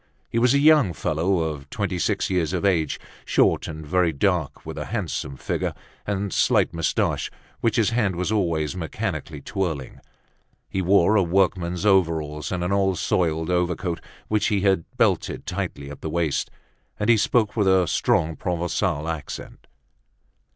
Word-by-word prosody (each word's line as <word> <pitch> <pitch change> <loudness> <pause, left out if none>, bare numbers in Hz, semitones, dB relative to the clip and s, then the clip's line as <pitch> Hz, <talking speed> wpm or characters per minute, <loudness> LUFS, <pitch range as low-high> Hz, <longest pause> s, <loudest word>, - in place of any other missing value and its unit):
He 115 - +1
was 125 +3 +4
a - - +5
young 145 - +5
fellow 85 +4 0
of 75 -3 -4
twenty 100 -2 -2
six - - 0
years 90 -2 0
of 90 +1 -1
age, 85 -6 +1 0.2
short - - +2
and 80 -1 -7
very 90 +1 +2
dark, 80 0 -1
with - - -6
a - - -4
handsome 70 0 -3
figure, - - -2 0.3
and 100 -1 -2
slight - - +3
moustaches 80 -1 0 0.3
which 115 -2 +1
his 115 -2 +2
hand 110 -6 +1
was 90 +4 -1
always 85 -6 0
mechanically 80 -2 -4
twirling. 80 -7 -3 0.7
He 95 - -2
wore 95 +2 +4
a 100 - +5
workman's 90 0 +1
overalls 80 -6 +1
and 90 -1 -1
an 90 - -1
old 95 -2 +2
soiled 80 -1 0
overcoat, 90 -1 -1 0.3
which 105 -1 +1
he 105 -3 +1
had 95 -4 +2
belted - - +1
tightly 70 0 -4
at 75 - -10
the 80 - -4
waist, 80 -2 0 0.5
and 105 - 0
he 120 - +6
spoke 110 0 +2
with 105 -4 +2
a 95 -2 +4
strong 80 0 +1
Provencal 85 -2 -1
accent. 80 -3 -6
90 Hz, 160 wpm, -24 LUFS, 80-100 Hz, 0.7 s, he